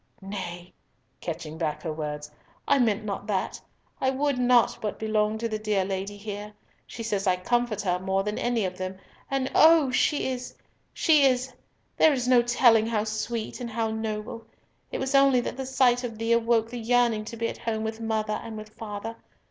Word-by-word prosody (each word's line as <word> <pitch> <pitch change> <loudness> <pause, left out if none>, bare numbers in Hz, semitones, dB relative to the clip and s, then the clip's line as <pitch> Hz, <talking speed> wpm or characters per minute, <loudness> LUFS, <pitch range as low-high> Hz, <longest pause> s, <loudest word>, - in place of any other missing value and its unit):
—Nay," 180 -3 -7 0.5
catching 160 -2 -6
back 155 -3 -2
her 160 -3 -2
words, 150 -1 -5 0.4
"I 280 - +4
meant 220 -3 +2
not 200 0 -4
that! 195 -3 -2 0.4
I 260 - +3
would 275 0 0
not 245 -1 +4
but 210 - -3
belong 215 0 0
to 230 +1 -2
the 215 -1 -3
dear 210 -3 0
Lady 195 +1 -4
here. 205 0 -7 0.3
She 230 - -7
says 205 -3 -1
I 185 - +4
comfort 235 +3 0
her 180 -2 0
more 190 +1 0
than 210 +1 -3
any 235 -4 0
of 185 0 -5
them, 185 0 -4 0.3
and 270 -1 -1
oh! 315 -4 +6
she 275 +2 +1
is—she 275 +4 0
is, 255 0 +1 0.4
there 315 - +6
is 250 -2 -1
no 250 -1 +6
telling 235 -2 +4
how 220 -2 0
sweet 220 +2 -4
and 240 - -4
how 225 0 -1
noble. 220 +1 -4 0.4
It - - -2
was 265 +1 -2
only 275 -2 +5
that - - -4
the 265 0 -5
sight 255 -1 +3
of 230 -3 -5
thee 225 +1 -1
awoke 230 -1 +2
the 245 - -5
yearning 235 -1 +2
to 230 +1 -7
be 230 0 0
at - - -6
home 220 -2 -2
with 220 +1 -4
mother 220 -1 -1
and 225 -1 -7
with 215 0 -8
father. 215 +1 -7
220 Hz, 195 wpm, -26 LUFS, 205-245 Hz, 0.5 s, oh